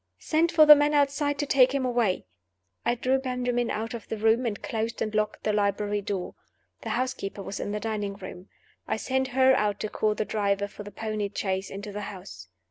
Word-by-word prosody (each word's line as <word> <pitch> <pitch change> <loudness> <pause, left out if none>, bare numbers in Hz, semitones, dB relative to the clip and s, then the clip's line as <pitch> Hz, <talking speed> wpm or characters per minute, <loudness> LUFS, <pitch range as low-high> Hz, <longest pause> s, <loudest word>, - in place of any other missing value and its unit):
Send 330 +2 +1
for 315 -2 +7
the 300 - +12
man 295 0 +3
outside 285 0 +1
to 290 - -1
take 260 -2 +4
him 270 -2 0
a 250 - 0
way. 230 - +1 0.6
I 240 - +1
drew 260 +2 +1
Benjamin 250 -2 -1
out 225 +2 -3
of 235 -3 -7
the 220 - -4
room, 225 +3 +2
and 205 -3 -3
closed 230 -5 -3
and 215 - -2
locked 215 0 -1
the 215 - +1
library 205 0 0
door. 195 -2 -4 0.5
The - - -6
housekeeper 235 -6 -3
was 195 - -5
in - - -3
the 210 - -2
dining 210 -2 -3
room. 185 -1 -10 0.4
I - - 0
sent 265 0 0
her 265 0 +4
out 205 -4 +1
to 215 - -2
call 215 0 0
the 215 - -1
driver 200 -2 0
of 205 - -13
the 205 - -8
pony 215 -1 -3
chaise 190 -1 -2
into 205 +2 -7
the 210 +1 -5
house. 190 - -9
220 Hz, 215 wpm, -27 LUFS, 205-260 Hz, 0.6 s, the